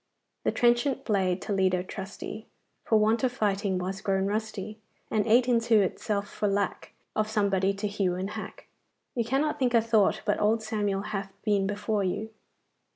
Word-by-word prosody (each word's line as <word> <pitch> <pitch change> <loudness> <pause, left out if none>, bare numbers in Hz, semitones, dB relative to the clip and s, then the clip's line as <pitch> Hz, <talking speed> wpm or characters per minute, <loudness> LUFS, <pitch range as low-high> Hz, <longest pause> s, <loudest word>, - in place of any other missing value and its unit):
"The - - +3
trenchant 245 +3 +2
blade, 190 -4 +1
Toledo 185 -3 +1
trusty, 195 +3 -7 0.4
For 220 - +4
want 220 +3 +2
of 255 - +3
fighting 200 -4 0
was 190 +2 -3
grown 195 -1 +1
rusty, 215 0 -3 0.3
And 215 0 +1
ate 240 +3 +5
into 230 -3 +4
itself 200 +2 -1
for 210 - -2
lack 200 -1 -1 0.2
Of 215 0 0
somebody 200 -3 +2
to 205 +2 -2
hew 195 -3 0
and 190 +3 -3
hack." - - -7 0.5
You 235 - 0
cannot 270 +6 0
think 250 -2 +2
a - - +7
thought 220 -3 +2
but 205 - +1
old 220 +1 +2
Samuel 205 -3 -1
hath 195 -2 -4
been 205 -3 +2
before 205 0 -1
you. 210 +4 -2
210 Hz, 165 wpm, -28 LUFS, 195-225 Hz, 0.5 s, a